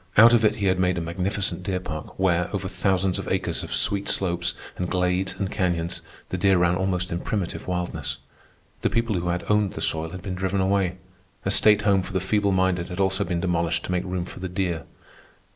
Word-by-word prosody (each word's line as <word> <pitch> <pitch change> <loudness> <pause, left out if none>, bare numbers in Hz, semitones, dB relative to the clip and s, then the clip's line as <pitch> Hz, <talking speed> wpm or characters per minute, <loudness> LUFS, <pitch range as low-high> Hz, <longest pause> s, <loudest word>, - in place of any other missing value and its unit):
Out 115 +3 +9
of 115 -1 +4
it 105 0 +4
he 105 -3 -2
had 95 -1 +2
made 90 0 +2
a - - +1
magnificent 90 +4 -2
deer 95 0 -1
park, 80 -3 -7
where, 90 -2 +2
over - - -2
thousands 95 -1 +1
of - - -5
acres - - -1
of - - -7
sweet 100 0 +1
slopes 85 -2 0 0.2
and 90 -1 -3
glades 90 0 0
and 100 +1 -2
canyons, 85 -3 -1 0.3
the 90 - -3
deer 95 0 +4
ran 90 0 +3
almost 95 -1 -1
in 85 - -1
primitive 95 -2 -3
wildness. 90 -1 -2 0.6
The - - +2
people 115 -2 0
who 85 - -3
had 85 0 -1
owned 105 -3 +2
the - - -6
soil 80 0 -1
had 90 +1 -8
been 95 - -3
driven 95 +1 -1
away. 95 -1 +1 0.5
A - - +2
state 105 -1 +5
home 100 -2 +4
for 95 - -8
the 95 - +2
feeble 100 +2 +1
minded 95 -2 +1
had 90 +1 -6
also 95 +1 +2
been 85 -2 -2
demolished 85 -2 0
to - - -4
make 90 -1 0
room 90 -1 -3
for - - -9
the 95 0 -4
deer. 90 -3 -2
95 Hz, 220 wpm, -25 LUFS, 90-95 Hz, 0.6 s, Out